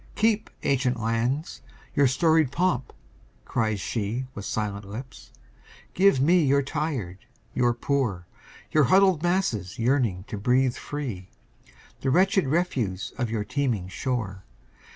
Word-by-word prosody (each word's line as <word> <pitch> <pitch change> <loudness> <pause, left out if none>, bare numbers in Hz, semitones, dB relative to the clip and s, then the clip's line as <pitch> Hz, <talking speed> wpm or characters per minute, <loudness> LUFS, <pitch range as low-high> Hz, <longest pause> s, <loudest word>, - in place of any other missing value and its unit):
"Keep, 220 -1 +1
ancient 130 -3 +1
lands, 115 +7 -1 0.3
your 140 -1 +4
storied 160 +1 +3
pomp!" 145 -5 0 0.5
cries 110 -3 0
she 115 +5 -2
With 100 - -7
silent 105 -1 -3
lips. 125 +5 -9 0.6
"Give 190 -7 +4
me 170 +6 +4
your 140 0 +3
tired, 135 - -3 0.3
your 120 -1 +2
poor, 120 -9 -1 0.5
Your 155 -2 +4
huddled 190 +2 +4
masses 125 - 0
yearning 120 -7 +1
to 105 -2 -6
be 125 +5 +3
free, 120 -10 -6 0.7
The 135 - -1
wretched 190 - +3
refuse 130 - -1
of 120 -2 0
your 110 -2 -1
teeming 125 -7 -1
shore. 100 -5 -3
130 Hz, 125 wpm, -26 LUFS, 110-150 Hz, 0.7 s, your